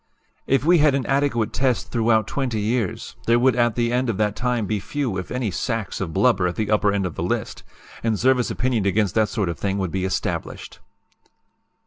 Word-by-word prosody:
"If 135 +1 +2
we 175 +1 +5
had 150 -2 +4
an 135 -3 -1
adequate 135 -6 0
test 125 -7 0
throughout 110 -2 +2
20 125 -2 -2
years, 110 -1 -2
there 115 +1 +5
would 130 +1 +3
at 120 -2 +2
the 120 0 0
end 125 0 +1
of 105 - -1
that 105 -1 0
time 125 -3 -1
be 105 0 -1
few 130 0 -3
if 90 -1 -5
any 125 -4 -2
sacks 115 0 -3
of 90 -4 -3
blubber 100 0 +2
at 85 - -3
the 110 -1 -2
upper 105 -1 +3
end 100 -1 0
of 90 - -3
the - - -5
list; - - -2 0.4
and 115 -2 0
service 130 -1 +2
opinion 120 -6 0
against 100 0 +1
that 110 -1 +2
sort 105 -3 -1
of 85 - -4
thing 100 -1 -1
would 95 -4 -2
be 95 -1 -2
established." 95 0 -3
115 Hz, 210 wpm, -22 LUFS, 100-125 Hz, 0.4 s, we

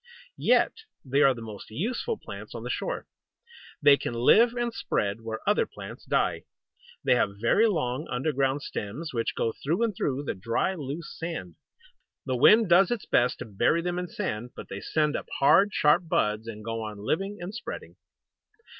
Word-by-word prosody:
Yet - - +4 0.3
they 135 +2 +2
are 135 -2 +5
the 115 - -8
most 105 -3 -9
useful 235 - -2
plants - - -9
on - - -6
the - - -3
shore. - - -3 0.8
They 140 -1 +8
can 120 - -4
live 225 - +5
and 240 -1 -1
spread 100 - -1
where 110 0 -6
other - - +3
plants - - -10
die. - - 0 0.6
They - - +4
have 100 -5 +1
very 205 - +4
long 140 - -1
underground 135 +1 0
stems, 135 +10 -5
which 115 -1 -1
go 115 - 0
through 165 +11 0
and 220 -4 0
through 140 -3 -1
the - - -2
dry, 115 - -1
loose 150 -1 -6
sand. 160 - -5 0.7
The 130 -2 -1
wind 215 - +6
does 175 +2 +5
its 240 -4 -2
best 125 +1 +2
to - - -5
bury 120 +10 +1
them 180 0 -1
in 180 - -3
sand, 120 -5 -4
but - - -9
they 100 +1 -6
send 150 -2 0
up - - -4
hard, 195 +9 +5
sharp 150 +1 +3
buds, 105 -6 0
and 110 -1 -8
go 115 0 -3
on 105 -1 -6
living, 195 - -2
and 175 +4 -6
spreading. 240 - -7
140 Hz, 180 wpm, -27 LUFS, 115-180 Hz, 0.8 s, They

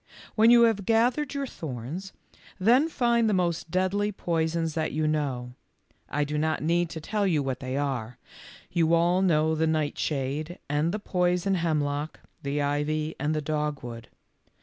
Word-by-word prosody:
When 225 +1 +5
you 240 0 +7
have 215 -4 +2
gathered 245 +6 +2
your 280 0 -1
thorns, 160 - -6 0.5
then 245 - +4
find 235 -5 +2
the 205 - +2
most 170 -2 -1
deadly 185 +4 0
poisons 165 -3 -1
that 160 0 -2
you 155 +1 0
know. 135 -5 -2 0.6
I 150 +2 0
do 150 +1 -2
not 155 -1 0
need 170 +1 +1
to 165 - -6
tell 200 +5 -1
you 155 -6 +1
what 130 -2 -3
they 130 0 -3
are. 125 -5 -2 0.5
You 165 -1 +3
all 175 +2 +3
know 160 -4 +3
the 160 0 +1
nightshade 155 +1 -1
and 150 +3 +1
the 210 - -2
poison 180 -1 0
hemlock, 155 -3 -1 0.2
the 145 0 -1
ivy 150 +2 -1
and 150 +3 0
the 155 - -1
dogwood. 145 -6 -3
160 Hz, 160 wpm, -27 LUFS, 145-185 Hz, 0.6 s, you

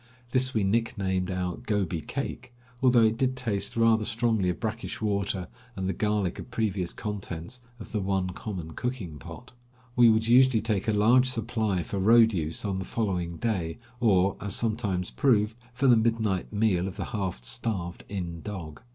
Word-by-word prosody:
This 130 0 +3
we 110 - +2
nicknamed 95 -3 0
our 90 -1 -2
"Gobi 100 -8 -1
cake," 125 - -5 0.3
although 125 -3 +5
it 110 0 +3
did 130 -1 +1
taste 115 -4 -1
rather 115 -1 +4
strongly 110 -3 +1
of 90 - -2
brackish 110 0 -4
water 100 -3 -1 0.3
and 95 -1 -2
the 95 - 0
garlic 105 -4 0
of - - -8
previous 100 -6 -1
contents 105 +2 -6 0.2
of 110 - -10
the 110 - -1
one 95 -1 0
common 90 -4 -6
cooking 100 - -4
pot. 125 - -10 0.4
We 120 -1 +7
would 110 0 +3
usually 125 0 +6
take 110 -3 -1
a - - +3
large 120 +5 +4
supply 110 -6 -1
for 100 - -4
road 115 +3 +6
use 80 +2 -2
on 95 -2 -1
the - - -3
following 90 -6 -2
day, 90 -8 -2 0.2
or, 100 -5 +3
as 100 - -1
sometimes 105 -6 -1
proved, 110 -5 +2 0.2
for 125 +3 -2
the 125 -3 +7
midnight 110 -4 0
meal 105 -4 +1
of 95 - -6
the - - -3
half 95 - -3
starved 85 - -3
inn 85 -4 -4
dog. 85 -7 -7
105 Hz, 175 wpm, -27 LUFS, 95-115 Hz, 0.4 s, We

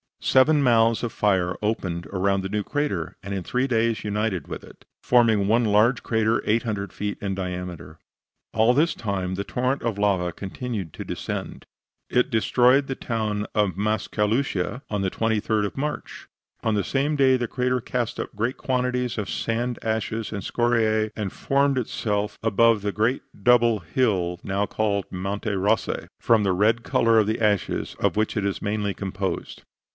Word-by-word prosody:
Seven 145 +3 +4
mouths 115 -2 +4
of 120 - -1
fire 95 -4 +1
opened 95 -6 -2
around 95 +2 0
the 95 - -4
new 105 +1 -1
crater, 100 - -2
and 100 +1 -5
in 95 - -2
three 125 +8 0
days 115 -2 +1
united 105 -5 -1
with - - -6
it, - - -16 0.2
forming 115 -5 +4
one 115 +3 +3
large 110 +4 +3
crater 110 0 +1
800 105 -3 -1
feet 105 0 -3
in 95 -1 -2
diameter. 90 -4 -6 0.5
All 110 +2 +4
this 155 +6 +2
time 95 -4 -2
the 100 - -2
torrent 130 +5 -1
of 115 -3 -2
lava 95 -4 +1
continued 100 - -5
to - - -6
descend, - - -5 0.4
it 125 - +2
destroying 125 +4 +3
the 135 - -4
town 110 -4 -2
of 100 -5 +1
Mascalucia 110 +2 0
on 105 -2 -1
the 95 -1 0
23d 110 -1 0
of 100 - -5
March. 150 +2 -4 0.4
On 110 - +1
the 100 - +1
same 140 +3 0
day 135 -2 +4
the 120 -2 -1
crater 125 0 0
cast 120 -1 -3
up - - -5
great 115 +5 -1
quantities 125 -1 -1
of 105 -2 -3
sand, 120 +2 -2
ashes 110 0 -2
and 105 -2 -4
scoriae, 110 -2 +1
and 105 -3 -3
formed 140 0 +1
above 125 - 0
itself 105 -1 -2
the 110 -1 +3
great 115 +5 +1 0.2
double 120 -3 +5
coned 85 -1 -21
hill 90 -9 +1
now 100 +1 0
called 100 -2 -1
Monte 100 +3 -3
Rossi, 100 +4 0
from 115 -2 +3
the 95 -2 +2
red 110 +5 +2
color 115 -1 +3
of 105 - +2
the 110 +1 -1
ashes 105 -3 0
of - - +1
which 110 +1 0
it 100 - 0
is 100 - -2
mainly 105 -1 -1
composed. 95 -2 -4
110 Hz, 170 wpm, -24 LUFS, 100-120 Hz, 0.5 s, double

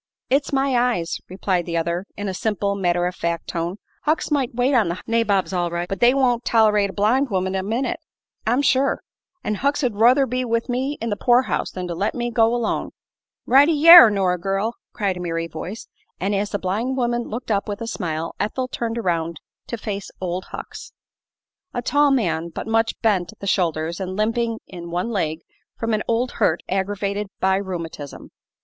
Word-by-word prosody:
"It's 275 +2 +2
my 270 -1 +1
eyes," 240 -9 0
replied 185 -1 -1
the 170 -1 -1
other, 170 +3 -2
in 205 0 -3
a 190 - -2
simple, 200 0 -1
matter 175 -3 +1
of 180 - -1
fact 170 -1 -3
tone. 170 +1 -2 0.3
"Hucks 310 +1 0
might 270 -5 0
wait 250 +3 +2
on 230 -7 +4
the 170 - -3
nabobs 215 -5 +1
all 175 -1 0
right, 170 +1 -3
but 195 - -4
they 240 +1 +6
won't 245 -3 +2
tol'rate 210 -3 +3
a - - -7
blind 250 +7 +2
woman 190 -2 -1
a 190 - 0
minute, 230 +7 -2 0.5
I'm 245 +5 +2
sure. 270 0 +2 0.4
An' 215 - -1
Hucks 285 +2 +1
'd 245 -4 +1
ruther 245 +6 +5
be 255 0 -2
with 230 0 -1
me 265 +4 -1
in 230 0 -3
the - - +1
poor 245 +4 +4
house - - -2
than 180 -1 -5
to 175 - -3
let 195 +5 -1
me 240 -1 -2
go 230 -1 +3
alone." 235 -2 -1 0.5
"Right 275 +3 +6
y' 315 0 +2
air, 335 -9 +12
Nora 190 -3 +1
girl!" 195 +5 -1 0.2
cried 195 -3 -1
a - - -6
merry 165 -1 -2
voice, 175 +6 -7 0.3
and 195 +2 -1
as 200 +1 0
the 205 - -1
blind 215 +8 -2
woman 240 -1 0
looked 230 +1 -5
up 200 -1 0
with 205 -1 -4
a 230 - -4
smile 165 -7 -3
Ethel 255 +5 -1
turned 235 -2 -3
around 170 -6 -1 0.3
to 235 - -4
face 205 -2 -5
"Old 185 0 -3
Hucks." - - -9 0.8
A 245 - -2
tall 290 +3 +3
man, 170 -11 0
but - - -6
much 225 0 0
bent 190 -7 +1
at - - -26
the - - -7
shoulders 170 -3 0
and 185 -1 -4
limping 225 +2 0
in 170 -2 -9
one 180 +7 -2
leg 160 -6 -1 0.4
from 225 -1 -1
an 215 - +1
old 235 +2 0
hurt - - +3
aggravated 200 +1 -2
by 190 0 +2
rheumatism. 170 -7 -6
205 Hz, 200 wpm, -22 LUFS, 180-240 Hz, 0.8 s, air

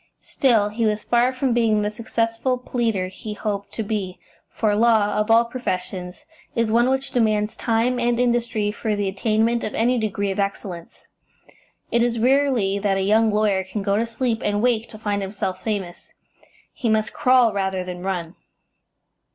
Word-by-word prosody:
Still, 225 -6 +2
he 225 +2 -3
was 215 -1 0
far 240 +1 +2
from 255 -1 0
being 220 -3 +2
the 210 - -1
successful 230 +2 -1
pleader 230 -6 -1
he 210 +3 -7
hoped 205 -2 -4
to 225 - -3
be, 200 -4 -3 0.3
for 210 -2 0
law, 220 -2 +3
of 210 +1 0
all 230 +1 +5
professions, 185 -6 -5 0.3
is 230 -2 +1
one 240 +3 +3
which 265 +1 -1
demands 215 -3 +1
time 235 +2 0
and 240 0 +1
industry 235 -4 +1
for 215 0 -2
the 205 -1 -1
attainment 220 +4 +1
of - - -4
any 245 +2 +2
degree 200 -2 -1
of 195 - -4
excellence. 195 -3 -4 0.9
It 235 - +2
is 235 0 +1
rarely 245 -5 +2
that 200 -1 +1
a 190 - 0
young 220 +3 +3
lawyer 210 -2 +1
can 195 +2 -5
go 200 0 +1
to 225 +3 0
sleep 230 -1 -1
and 205 +1 0
wake 235 -2 +1
to 215 - -11
find 205 -2 -2
himself 195 -1 -4
famous; 195 -5 -4 0.6
he 240 - -2
must 215 0 +1
crawl 250 -3 +4
rather 190 -2 -1
than 180 -1 -7
run. 180 -2 -3
215 Hz, 175 wpm, -22 LUFS, 200-235 Hz, 0.9 s, all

